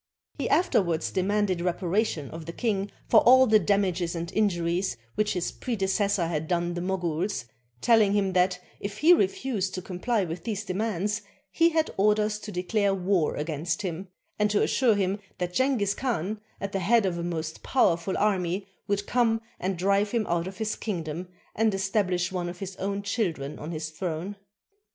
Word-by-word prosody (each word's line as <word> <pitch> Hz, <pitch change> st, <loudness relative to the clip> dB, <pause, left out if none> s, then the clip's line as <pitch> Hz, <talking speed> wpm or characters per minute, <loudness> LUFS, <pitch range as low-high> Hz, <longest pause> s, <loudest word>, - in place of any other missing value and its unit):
He -, -, -1 dB
afterwards 175 Hz, -, +2 dB
demanded 190 Hz, -1 st, +1 dB
reparation 175 Hz, -3 st, -1 dB
of 160 Hz, 0 st, -8 dB
the -, -, -3 dB
king 205 Hz, -3 st, -1 dB, 0.2 s
for 225 Hz, -, +7 dB
all 260 Hz, +3 st, +7 dB
the 215 Hz, -3 st, +5 dB
damages 185 Hz, -3 st, +1 dB
and 170 Hz, +1 st, -4 dB
injuries 175 Hz, -, +1 dB, 0.2 s
which 210 Hz, 0 st, +1 dB
his 180 Hz, -2 st, -2 dB
predeces 200 Hz, -3 st, 0 dB
sor 175 Hz, -4 st, +1 dB
had 160 Hz, -2 st, -2 dB
done 175 Hz, 0 st, 0 dB
the 175 Hz, -, -3 dB
Moguls, 180 Hz, -, -1 dB, 0.4 s
telHng 220 Hz, -4 st, +5 dB
him 195 Hz, -2 st, +1 dB
that, 180 Hz, 0 st, +2 dB, 0.2 s
if 200 Hz, +1 st, -5 dB
he 325 Hz, +8 st, +7 dB
refused 200 Hz, -, 0 dB
to 185 Hz, -, -3 dB
comply 195 Hz, +3 st, -1 dB
with 165 Hz, 0 st, -6 dB
these 210 Hz, -2 st, -3 dB
demands, 210 Hz, +1 st, -1 dB, 0.3 s
he 335 Hz, 0 st, +4 dB
had 320 Hz, -1 st, +1 dB
orders 210 Hz, +1 st, +2 dB
to 210 Hz, -, -7 dB
declare 195 Hz, +2 st, +1 dB
war 185 Hz, -4 st, +1 dB
against 165 Hz, +5 st, -2 dB
him, 185 Hz, +1 st, -4 dB, 0.3 s
and 210 Hz, 0 st, +3 dB
to 205 Hz, -, +2 dB
assure 240 Hz, -5 st, +3 dB
him 195 Hz, 0 st, 0 dB, 0.2 s
that 180 Hz, 0 st, -3 dB
Jenghiz 255 Hz, -6 st, +2 dB
Khan, 215 Hz, -5 st, -2 dB, 0.2 s
at 200 Hz, -, -4 dB
the 195 Hz, -, -1 dB
head 220 Hz, +4 st, +3 dB
of 175 Hz, -2 st, -1 dB
a -, -, -3 dB
most 160 Hz, -2 st, -4 dB
powerful 180 Hz, -7 st, +2 dB
army, 190 Hz, -2 st, 0 dB, 0.2 s
would 200 Hz, 0 st, 0 dB
come 230 Hz, -1 st, +2 dB, 0.2 s
and 185 Hz, 0 st, -2 dB
drive 200 Hz, +3 st, +2 dB
him 225 Hz, -1 st, 0 dB
out 170 Hz, 0 st, 0 dB
of 190 Hz, -, -8 dB
his 215 Hz, -1 st, -1 dB
kingdom 170 Hz, -4 st, -4 dB, 0.3 s
and 220 Hz, 0 st, +2 dB
estabHsh 190 Hz, -2 st, 0 dB
one 180 Hz, -2 st, -2 dB
of 175 Hz, -, -7 dB
his 190 Hz, 0 st, -6 dB
own 200 Hz, +1 st, -2 dB
children 175 Hz, -, -2 dB
on 155 Hz, -, -6 dB
his 155 Hz, -1 st, -4 dB
throne. 175 Hz, +3 st, -4 dB
195 Hz, 180 wpm, -27 LUFS, 175-210 Hz, 0.4 s, for